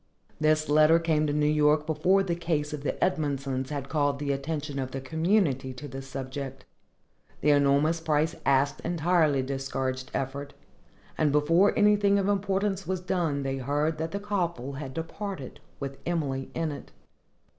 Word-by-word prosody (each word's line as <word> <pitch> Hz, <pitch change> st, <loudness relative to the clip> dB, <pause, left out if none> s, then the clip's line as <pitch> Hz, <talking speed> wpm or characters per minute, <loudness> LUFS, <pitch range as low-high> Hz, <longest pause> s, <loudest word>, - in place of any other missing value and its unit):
This 155 Hz, 0 st, +2 dB
letter 155 Hz, +2 st, +6 dB
came 160 Hz, -2 st, +1 dB
to 145 Hz, -, 0 dB
New 150 Hz, 0 st, +2 dB
York 150 Hz, 0 st, +3 dB
before 170 Hz, +5 st, +2 dB
the 180 Hz, -3 st, -1 dB
case 160 Hz, -3 st, -1 dB
of 150 Hz, -, -4 dB
the 145 Hz, -, -1 dB
Edmondsons 140 Hz, -6 st, -1 dB
had 140 Hz, -2 st, -4 dB
called 145 Hz, -2 st, +1 dB
the 140 Hz, 0 st, -2 dB
attention 140 Hz, 0 st, -3 dB
of 130 Hz, -1 st, -2 dB
the 135 Hz, -, -5 dB
community 155 Hz, -2 st, +1 dB
to 145 Hz, +3 st, -8 dB
this 135 Hz, 0 st, -8 dB
subject. 135 Hz, 0 st, -6 dB, 0.8 s
The 150 Hz, -, +4 dB
enormous 145 Hz, +3 st, +3 dB
price 160 Hz, 0 st, +1 dB
asked 140 Hz, +1 st, +2 dB
entirely 165 Hz, -4 st, +2 dB
discouraged 130 Hz, -1 st, -3 dB
effort, 140 Hz, +2 st, -4 dB, 0.6 s
and 155 Hz, -2 st, +3 dB
before 165 Hz, +7 st, +3 dB
anything 205 Hz, -1 st, +4 dB
of 195 Hz, -1 st, +1 dB
importance 195 Hz, 0 st, 0 dB
was 190 Hz, 0 st, -1 dB
done 175 Hz, -6 st, -1 dB
they 135 Hz, 0 st, -2 dB
heard 145 Hz, +4 st, -1 dB
that 160 Hz, +1 st, -2 dB
the 200 Hz, -, -4 dB
coffle 175 Hz, -10 st, -2 dB
had 135 Hz, -1 st, -7 dB
departed, 165 Hz, -3 st, -5 dB, 0.2 s
with 140 Hz, -1 st, -5 dB
Emily 140 Hz, -6 st, -2 dB
in 165 Hz, -2 st, -1 dB
it. 145 Hz, -, -9 dB
150 Hz, 160 wpm, -27 LUFS, 140-165 Hz, 0.8 s, letter